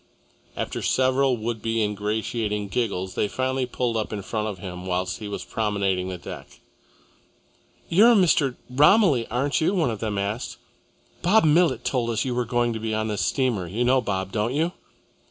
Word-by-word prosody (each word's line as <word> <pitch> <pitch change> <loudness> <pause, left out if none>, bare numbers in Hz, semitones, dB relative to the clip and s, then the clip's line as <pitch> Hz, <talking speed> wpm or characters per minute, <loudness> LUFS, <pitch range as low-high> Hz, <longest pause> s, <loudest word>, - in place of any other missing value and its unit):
After - - -3
several 130 0 +2
would 115 0 -4
be 115 -1 0
ingratiating 105 0 -2
giggles, 95 -4 -2
they - - 0
finally 130 +3 -1
pulled 120 -1 -2
up 110 -1 -2
in 105 -2 -4
front 110 +2 -2
of 105 -3 -4
him 90 0 -7
whilst 90 +4 -2
he 105 - -6
was 100 - -5
promenading 100 -4 -1
the 90 - -5
deck. - - -10 1.3
"You 200 +7 +6
are 240 - +6
Mr. 155 - +3
Romilly, 145 - +4
aren't 135 +7 0
you?" 185 +5 +2
one 160 -10 +1
of 110 - -5
them 105 -3 -2
asked. 100 +5 -3 0.6
"Bob 210 +6 +4
Millet 165 +2 +3
told 120 -3 0
us 115 +2 -1
you 130 - -1
were 125 0 0
going 120 0 0
to 110 - -4
be 110 0 -2
on 110 0 -1
this 105 - -2
steamer. 120 -10 0
You 110 +8 -1
know 130 +1 +3
Bob, 95 -4 -3
don't 110 +5 -1
you?" 165 +4 +1
115 Hz, 185 wpm, -24 LUFS, 105-130 Hz, 1.3 s, You